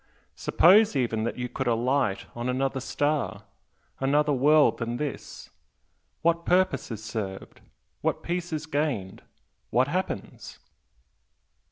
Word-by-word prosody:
Suppose 200 +2 +5
even 115 -4 0
that 120 - -3
you 125 0 -3
could - - -4
alight 120 -2 +1
on 120 +1 -3
another 135 +1 -1
star 145 +3 -1 0.6
another 145 +2 +2
world 150 +3 +4
than 120 0 -3
this 150 0 -6 0.7
what 170 0 +2
purpose 185 +2 +1
is 110 -2 -6
served? 105 -4 -6 0.4
what - - -1
peace 175 0 -3
is 155 0 -3
gained? 145 -11 -2 0.5
what 125 +3 +2
happens?" 185 +5 -4
135 Hz, 120 wpm, -26 LUFS, 120-155 Hz, 0.7 s, Suppose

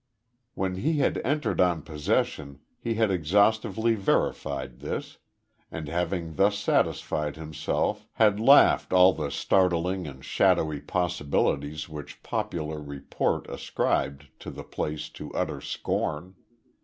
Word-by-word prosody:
When 95 -1 -2
he 150 - 0
had 145 - +1
entered 145 -1 0
on 85 -4 +2
possession 75 -2 -2 0.2
he 115 -1 -2
had 110 -2 +2
exhaustively 105 +6 +2
verified 70 - -1
this, - - -5 0.5
and 80 -2 -6
having 85 -1 -2
thus 100 +1 +3
satisfied 75 -7 0
himself 80 +7 -2
had 105 -2 +3
laughed 135 -2 +6
all 90 0 +7
the 75 -4 -3
startling 90 +3 +1
and 65 -2 -10
shadowy 75 -2 +2
possibilities 75 -3 -1
which 75 -2 -9
popular 75 -2 -3
report 70 -2 -2
ascribed 70 +1 -2
to - - -8
the - - -8
place 75 0 -4
to - - -9
utter - - -2
scorn. 85 +5 -3
85 Hz, 120 wpm, -27 LUFS, 75-100 Hz, 0.5 s, all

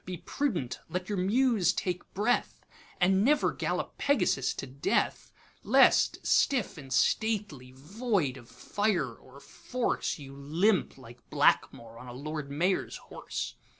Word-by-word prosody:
be 180 -1 -6
prudent, 170 - -2
let 180 +1 -4
your 205 - -1
Muse 210 -2 +3
take 180 -1 -4
breath, 215 +5 0 0.3
And 190 +2 +3
never 290 +4 +3
gallop - - -3
Pegasus 265 - +1
to - - -5
death; 135 +1 -1 0.3
Lest - - +4
stiff 245 -7 +2
and 135 -5 -11
stately, 200 - 0
void 180 - -1
of 120 -2 -13
fire 175 - -1
or 130 +4 -16
force, 240 - -3
You 135 -2 -11
limp, 165 +9 +1
like 125 -2 -15
Blackmore, 115 0 +1
on 125 - -11
a 120 - -8
lord 150 +2 -5
mayor's 175 +7 0
horse. - - -6
175 Hz, 135 wpm, -29 LUFS, 135-210 Hz, 0.3 s, Lest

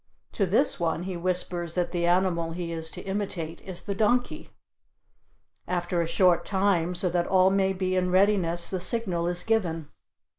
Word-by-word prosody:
To 195 - 0
this 230 +11 +1
one 165 0 -1
he 185 0 -4
whispers 175 -1 -2
that 180 -1 -1
the 175 -1 0
animal 175 -2 +1
he 170 -1 -4
is 160 -1 -1
to - - -8
imitate 190 -5 -4
is 185 -2 -6
the 200 - -3
donkey. 225 +4 0 1.2
After 175 -1 -1
a 165 - -1
short 180 0 +3
time, 190 -3 0
so 180 +1 0
that 175 0 0
all 190 0 +4
may 195 0 +2
be 185 -1 -2
in 180 0 +1
readiness, 185 -3 +3
the 185 - -2
signal 180 -4 -1
is 175 0 -1
given. 170 -9 -1
180 Hz, 175 wpm, -26 LUFS, 170-190 Hz, 1.2 s, all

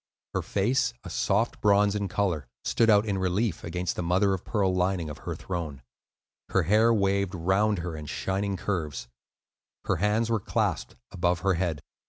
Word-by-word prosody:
Her - - 0
face, 120 +4 0
a - - -8
soft 105 +4 0
bronze 100 0 +4
in 100 -1 -1
color, 90 -10 -1 0.2
stood 115 - +3
out 105 0 +5
in 100 -3 -1
relief 95 +1 0
against 90 +1 -2
the - - -2
mother 95 +3 +2
of 95 - -3
pearl 100 -4 +1
lining 90 -3 0
of - - -9
her - - -5
throne. 80 -7 -5 0.7
Her 95 - +2
hair 110 +7 +4
waved 100 -3 +1
round 95 +5 +2
her 85 -1 -4
in 75 -1 -7
shining 95 +4 -2
curves. 80 -10 -3 0.8
Her - - +1
hands 105 +5 +1
were 115 - +2
clasped - - -1 0.2
above 90 -2 0
her 95 0 +2
head. 85 -4 -1
95 Hz, 175 wpm, -27 LUFS, 90-105 Hz, 0.8 s, out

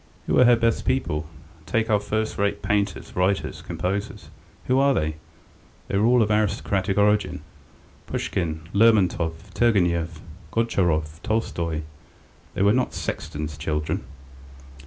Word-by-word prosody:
"Who - - +2
are 125 - +7
her 120 0 +7
best 115 0 +1
people? 75 -13 -1 0.4
Take 110 +4 +1
our 105 - +4
first 110 +1 -2
rate 100 0 0
painters, 100 -2 -1
writers, 95 +2 0
composers.... 100 +3 -4 0.4
Who 130 +1 +2
are 140 0 +4
they? 80 0 -1 0.7
They - - 0
were 110 - +3
all 120 -1 +5
of 110 - -1
aristocratic 100 -2 0
origin. 105 0 +2 0.7
Pushkin, 80 -3 -2
Lermontov, 100 -6 +3 0.2
Turgenev, 85 -7 +1 0.3
Gontcharov, 85 -8 0
Tolstoy, 85 -8 -1 0.7
they - - +1
were 100 +1 +5
not 125 0 0
sexton's 75 0 -4
children." 75 -2 -2
100 Hz, 125 wpm, -24 LUFS, 85-110 Hz, 0.7 s, are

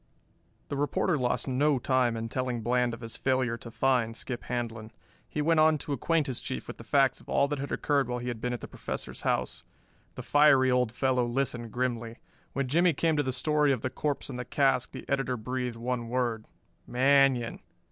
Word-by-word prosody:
The - - -2
reporter 145 +4 +1
lost 125 -2 0
no 140 +2 +2
time 125 -2 +1
in 115 0 -3
telling 125 -1 -2
Bland 120 +1 +1
of 115 - -16
his 115 -1 -8
failure 130 -3 +1
to 115 - -10
find 120 -2 +1
Skip 125 -3 -5
Handlon. 115 -2 -4 0.4
He 150 - -2
went 165 +1 +3
on 155 0 +5
to 145 0 -4
acquaint 155 +4 +1
his 130 -4 -3
Chief 130 - -5
with - - -7
the - - -10
facts 135 +3 +2
of - - -17
all 140 - +3
that 145 -1 -2
had 140 - -4
occured 140 -4 +1
while 125 - -1
he 120 0 -5
had 115 -2 -5
been 125 - -1
at 120 - -4
the - - -6
Professor's - - -6
house. - - -1 0.5
The - - -6
fiery 140 -3 +5
old 125 -2 +2
fellow 125 0 +1
listened 120 -2 -2
grimly. 120 -2 -2 0.4
When 140 -1 -1
Jimmie 170 +5 +3
came 160 +2 +1
to 150 - +2
the 130 -2 -1
story 150 +3 +2
of 130 -4 0
the 130 - -2
corpse 145 -2 -2
and 125 -3 -6
the - - -2
cask 135 -2 +1
the - - -9
editor 135 -2 0
breathed 125 +1 -3
one 120 0 -3
word, 120 -3 -1 0.4
"Manion!" 130 -1 +3
125 Hz, 210 wpm, -29 LUFS, 120-140 Hz, 0.5 s, on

